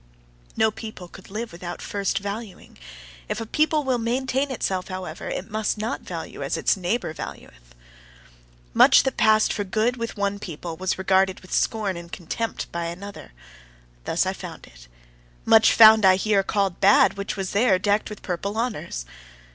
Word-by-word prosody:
No 220 0 +3
people 215 -5 -9
could 185 +1 -14
live 220 +4 -5
without 175 +1 -7
first 200 -1 -2
valuing; 200 0 -7 0.5
if - - -2
a 225 - -4
people 305 +5 +1
will 260 -3 0
maintain 260 +4 -1
itself, 190 -7 -2
however, 185 -4 -6
it 195 +4 -5
must 215 0 -1
not 215 +2 -3
value - - -7
as - - -2
its - - +2
neighbour 185 -1 -2
valueth. - - -10 1.0
Much - - +7
that 265 - -1
passed 215 0 +4
for 205 - -2
good 220 +5 0
with 230 -2 -5
one 200 0 -1
people 170 -3 -6
was 185 +2 -2
regarded 190 0 +2
with 185 - -10
scorn 205 -5 0
and 170 0 -10
contempt 210 +7 -4
by 170 0 -3
another: 185 - -8 0.7
thus - - +1
I - - -1
found - - -9
it. - - -17 0.6
Much 220 0 +6
found 220 -1 +8
I 190 -1 +7
here 200 +1 +2
called 195 -2 -1
bad, 200 +1 +5
which 200 +1 -4
was 190 -1 -3
there 200 -2 +3
decked 205 +4 0
with 210 - -10
purple 200 +4 -3
honours. 220 - -3
200 Hz, 170 wpm, -24 LUFS, 185-220 Hz, 1.0 s, found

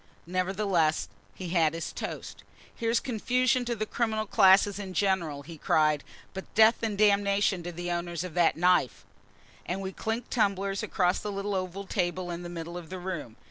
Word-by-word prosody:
Nevertheless, 185 -3 0 0.3
he 185 -2 -6
had 165 -2 +2
his 165 - -5
toast. - - -6 0.3
"Here's 230 0 +1
confusion 250 +1 +1
to 240 0 -1
the 215 -1 -2
criminal 220 -1 -1
classes 200 -1 +5
in 190 -2 -6
general," 170 -8 0
he 160 +1 -11
cried; 155 -1 +2 0.3
"but 190 0 -8
death 220 +1 +6
and 220 -3 -2
damnation 200 -2 +3
to 175 +1 -5
the 175 +1 -4
owners 175 0 -2
of 180 -3 -7
that 170 -2 +3
knife!" 180 -6 +2 0.6
And 180 +2 -3
we 190 -1 -4
clinked 225 +5 -4
tumblers 200 -3 +1
across 180 0 +1
the 210 - -4
little 200 +1 -3
oval 190 +1 -3
table 180 -2 -2
in 170 0 -5
the 175 - -7
middle 170 0 -6
of 165 -3 -12
the 185 - -5
room. 175 -11 -5
190 Hz, 180 wpm, -28 LUFS, 175-205 Hz, 0.6 s, death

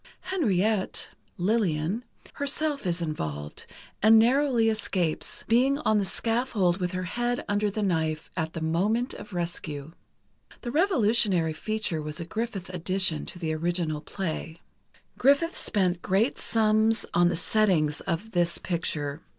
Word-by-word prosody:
Henriette 215 - 0 0.3
(Lillian) 185 0 0 0.3
herself 285 -3 -1
is 170 0 0
involved, 75 - -5 0.3
and 220 +2 +7
narrowly 245 0 +4
escapes—being 220 - +1
on 215 -8 +2
the 200 - 0
scaffold 225 -4 +1
with 180 -1 -2
her 185 0 -2
head 240 +6 -2
under 205 +1 +1
the 210 +1 -2
knife 160 -4 -1
at 160 -2 -2
the 165 - -5
moment 205 +10 +1
of - - -10
rescue. 165 -4 -4 0.7
The 240 - -4
revolutionary 220 - +2
feature 205 -2 -2
was 150 0 -5
a 170 - -4
Griffith 200 -1 -4
addition 185 -2 -1
to - - -7
the 160 -3 -2
original 165 -1 -1
play. 160 -1 -5 0.6
Griffith 285 +6 +3
spent 180 -4 0
great 205 +8 +1
sums 220 0 +2
on 175 0 +5
the 175 - +1
settings 170 -5 +2
of 190 +5 -2
this 175 -2 +1
picture. 155 -4 -2
190 Hz, 135 wpm, -27 LUFS, 165-225 Hz, 0.7 s, and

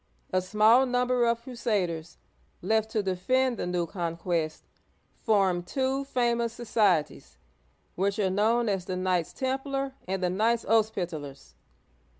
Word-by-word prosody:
A 185 - +3
small 215 +7 +4
number 250 -1 +2
of 235 0 0
crusaders, 190 -10 -2 0.5
left 220 +3 +1
to 215 -1 -1
defend 240 +7 +1
the - - -3
new 180 -1 0
conquest, 170 -2 -3 0.6
formed 190 -5 +2
two 270 +3 -1
famous 235 -3 0
societies, 205 - 0 0.6
which 195 +2 -1
are 195 -3 +1
known 225 +4 +2
as 195 -3 -1
the 185 0 -3
"Knights 185 -2 0
Templar 270 +1 -2
and 190 0 -2
the 180 - +2
" - - -2
Knights 230 +1 +2
Hos'pitalers." 175 -11 -1
210 Hz, 135 wpm, -27 LUFS, 180-240 Hz, 0.6 s, small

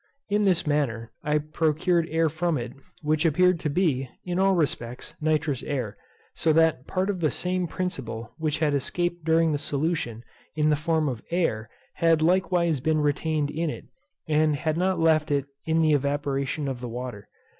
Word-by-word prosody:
In 205 0 +2
this 180 -2 +3
manner 130 -7 -1
I 150 0 +2
procured 160 +3 +1
air 165 +1 +2
from 165 +1 0
it, 120 0 -5 0.3
which 155 +1 +1
appeared 180 +2 +3
to 150 - -2
be, 140 -6 +1 0.2
in 180 0 -1
all 195 0 +4
respects, 125 -6 -1
nitrous 150 -3 +1
air; 125 -8 -3 0.4
so 160 - +2
that 160 -4 +3
part 190 +2 0
of 190 - -5
the 155 -3 +2
same 180 +5 -1
principle 130 - -4
which 155 -1 0
had 155 -2 +1
escaped 175 +5 -1
during 165 0 +3
the 145 - 0
solution, 140 -6 -2 0.3
in 155 0 +2
the - - +4
form 155 +1 0
of 125 -5 -3
air, 115 -11 0 0.2
had 165 -2 +3
likewise 175 -3 +2
been 155 +4 +1
retained 150 0 0
in 165 +1 -1
it, - - -7 0.4
and 155 -1 +3
had 155 +2 -1
not 185 +1 +1
left 160 -1 +3
it 140 -2 +1 0.2
in 160 0 +3
the 155 -1 +4
evaporation 140 0 -1
of 130 -2 -4
the 125 - -5
water. 120 -3 -6
155 Hz, 175 wpm, -26 LUFS, 140-170 Hz, 0.4 s, all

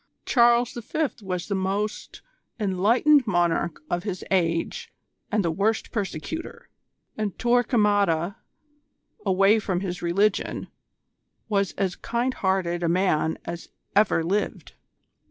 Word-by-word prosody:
Charles 240 -1 +4
V. 265 +6 -2
was 180 -3 -4
the 205 - -2
most 200 +2 -3 0.4
enlightened 230 +8 +3
monarch 175 -4 0
of 175 - -1
his 190 -2 -5
age 165 -3 0 0.4
and 210 -3 +1
the 165 - +1
worst 210 +6 0
persecutor, 215 - -5 0.5
and 210 -3 -2
Torquemada, 205 -7 +2 0.9
away 195 +4 +4
from 185 -4 -2
his 180 -2 -4
religion, 195 +4 0 0.8
was 200 -3 +1
as 190 -3 -1
kind 240 +2 -1
hearted 190 -4 0
a 170 - +1
man 170 -3 +1
as 170 0 -6 0.3
ever 205 -5 +3
lived. 200 +5 -2
195 Hz, 115 wpm, -25 LUFS, 175-220 Hz, 0.9 s, Charles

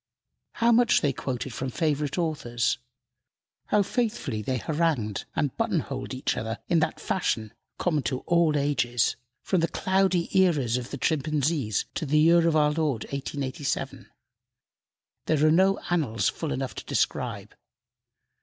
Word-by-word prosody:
How 235 +1 +3
much 235 0 +4
they 145 -3 +1
quoted 125 -1 -4
from 130 +2 -3
favorite 150 +1 -1
authors 140 -9 -1 0.9
how 210 -1 +3
faithfully 205 - -2
they 130 +4 -1
harangued 145 -7 -1
and 145 - 0
button 225 -6 +1
holed 130 -2 -5
each 130 - -1
other 110 +1 -3
in 170 -2 +3
that 160 - -1
fashion, 110 - -1 0.2
common 155 -5 +1
to 130 - -1
all 170 -3 +2
ages, 130 -5 +1 0.3
from 185 - +1
the 165 - +2
cloudy 190 -1 +1
eras 150 -11 +3
of 125 -1 -3
the - - -5
Chimpanzees 150 -6 0
to 160 - -3
the 150 +2 +2
year 165 +2 +5
of 165 - +2
our 150 -1 +4
Lord 150 -7 -1
1887 140 0 -3 1.2
there 155 -1 +3
are 155 - +5
no 190 +4 +4
annals 140 -11 +1
full 160 -3 -4
enough 130 0 -3
to - - -6
describe. - - -2
150 Hz, 145 wpm, -26 LUFS, 130-170 Hz, 1.2 s, year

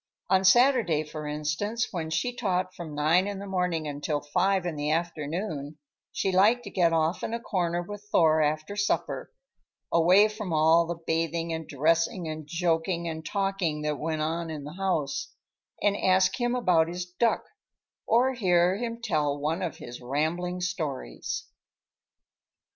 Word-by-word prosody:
On 190 0 +4
Saturday, 225 - +4
for 150 0 -7
instance, 155 +10 -2
when 165 -3 -3
she 200 +10 -1
taught 185 -5 -1
from 160 -4 -8
nine 160 +6 +3
in 205 -1 -4
the 200 - -6
morning 180 -5 -1
until 145 +1 -2
five 180 +6 +1
in 170 -3 -2
the 145 0 -2
afternoon, 160 -1 -3 0.3
she 190 - -1
liked 210 +6 +4
to - - -8
get 175 -3 +3
off 165 +1 +1
in 230 - -2
a - - -3
corner 175 -6 -1
with 205 +3 -8
Thor 160 -1 +4
after 155 +5 -1
supper, 205 -1 -1 0.6
away 180 +5 +6
from 215 -3 -6
all 160 +2 +4
the 170 -1 -3
bathing 165 0 -1
and 160 -1 -5
dressing 165 +4 +1
and 155 -1 -6
joking 170 +1 0
and 160 -1 -5
talking 195 -5 -1
that 150 -1 -1
went 155 -1 -2
on 165 +1 -2
in 155 -2 -5
the 150 +2 -8
house, 180 -6 -2 0.5
and 205 -1 +3
ask 185 +3 +2
him 240 +1 +1
about 180 -9 +3
his 175 +1 -4
duck, 180 +6 0 0.6
or 250 +3 +3
hear 180 -5 +3
him 230 0 -4
tell 150 -9 0
one 155 +5 -1
of 175 -5 -3
his 120 - -9
rambling 165 +8 -1
stories. 145 - -3
170 Hz, 160 wpm, -27 LUFS, 155-190 Hz, 0.6 s, away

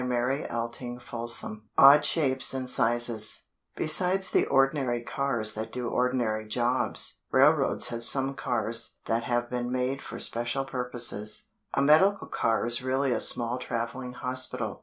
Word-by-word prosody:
ODD 120 -1 -4 1.0
SHAPES 135 -5 +2
AND 130 -1 -4
SIZES 120 -2 +1 0.3
Besides 180 +5 +3
the - - +1
ordinary 135 -3 0
cars 120 -5 -2
that 110 +1 -6
do 125 -2 -3
ordinary 120 -4 -1
jobs, 120 +3 +1
railroads - - +2
have 115 0 -5
some 135 +2 +5
cars 115 -3 -3
that 115 +1 -2
have 120 0 -1
been 125 0 -3
made 130 +2 -2
for - - -9
special 120 +3 -3
purposes. 120 -5 -2 0.3
A 140 - +1
medical 190 +8 +3
car 115 -1 -1
is 120 +1 -3
really 130 +1 -1
a - - -1
small 120 +1 +4
traveling 125 +1 -5
hospital. 130 +1 -2
125 Hz, 130 wpm, -26 LUFS, 120-135 Hz, 1.0 s, some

